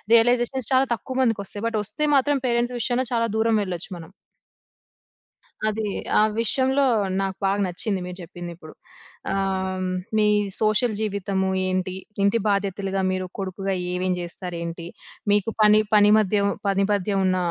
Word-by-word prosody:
Realisations 245 Hz, +1 st, +2 dB
చాలా 260 Hz, +1 st, +4 dB
తక్కువ 255 Hz, +4 st, -7 dB
మందికోస్తాయి. 205 Hz, -3 st, -2 dB
But 230 Hz, -1 st, -1 dB
వస్తే 300 Hz, +9 st, -3 dB
మాత్రం 285 Hz, +1 st, +2 dB
పేరెంట్స్ 240 Hz, +1 st, 0 dB
విషయంలో 250 Hz, +2 st, 0 dB
చాలా 230 Hz, -1 st, +2 dB
దూరమెళ్ళొచ్చు 210 Hz, -6 st, 0 dB
మనం. 165 Hz, +1 st, -11 dB, 1.6 s
అది. 215 Hz, 0 st, -2 dB, 0.3 s
ఆ -, -, +5 dB, 0.2 s
విషయంలో 265 Hz, +4 st, +2 dB, 0.4 s
నాకు 195 Hz, -1 st, -2 dB
బాగా 195 Hz, +1 st, +1 dB
నచ్చింది 185 Hz, +2 st, -2 dB
మీరు 180 Hz, 0 st, -7 dB
చెప్పిందిప్పుడు. 175 Hz, -2 st, -9 dB, 0.6 s
ఆహ్, 190 Hz, -1 st, -1 dB, 0.3 s
మీ 215 Hz, -1 st, +4 dB, 0.3 s
సోషల్ 215 Hz, +2 st, +2 dB
జీవితము 200 Hz, -2 st, -1 dB, 0.2 s
ఏంటి, 185 Hz, 0 st, -1 dB, 0.3 s
ఇంటి 200 Hz, +3 st, +3 dB
బాధ్యతలుగా 195 Hz, -1 st, -1 dB
మీరు 185 Hz, 0 st, -2 dB
కొడుకుగా 195 Hz, 0 st, -3 dB, 0.2 s
ఏమేమి 180 Hz, 0 st, -1 dB
చేస్తారు 175 Hz, 0 st, -6 dB
ఏంటి, 170 Hz, 0 st, -6 dB, 0.5 s
మీకు 205 Hz, +1 st, +2 dB
పని 210 Hz, 0 st, +6 dB
పని 205 Hz, 0 st, +6 dB
మధ్య, 210 Hz, -1 st, +2 dB, 0.3 s
పని 195 Hz, 0 st, +2 dB
మధ్య 205 Hz, 0 st, 0 dB
ఉన్న 185 Hz, 0 st, +2 dB
200 Hz, 135 wpm, -24 LUFS, 185-225 Hz, 1.6 s, పని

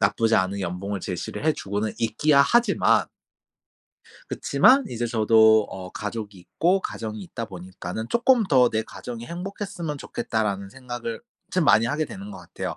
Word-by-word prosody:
나쁘지 110 Hz, +2 st, +2 dB
않은 95 Hz, +1 st, 0 dB
연봉을 95 Hz, +3 st, -3 dB
제시를 90 Hz, -, -5 dB
해 155 Hz, -, +4 dB
주고는 105 Hz, +2 st, -3 dB
있기야 140 Hz, +6 st, +3 dB
하지만 235 Hz, +6 st, +3 dB, 1.2 s
그치만 270 Hz, +1 st, +4 dB
이제 120 Hz, 0 st, -3 dB
저도 110 Hz, -1 st, +5 dB
어 95 Hz, -1 st, -8 dB
가족이 105 Hz, 0 st, -6 dB
있고 175 Hz, -, 0 dB
가정이 110 Hz, -1 st, -5 dB
있다 115 Hz, +5 st, -6 dB
보니까는 95 Hz, +3 st, -7 dB
쪼끔 235 Hz, -1 st, +3 dB
더 130 Hz, -8 st, +4 dB
'내 110 Hz, -, -1 dB
가정이 120 Hz, +1 st, -8 dB
행복했으면 180 Hz, -, -5 dB
좋겠다.'라는 105 Hz, -7 st, -3 dB
생각을 120 Hz, -1 st, -6 dB, 0.3 s
참 180 Hz, -3 st, +1 dB
많이 115 Hz, -5 st, +5 dB
하게 150 Hz, +6 st, 0 dB
되는 195 Hz, +5 st, -9 dB
거 200 Hz, -, -9 dB
같아요. -, -, -6 dB
115 Hz, 350 characters per minute, -24 LUFS, 100-155 Hz, 1.2 s, 저도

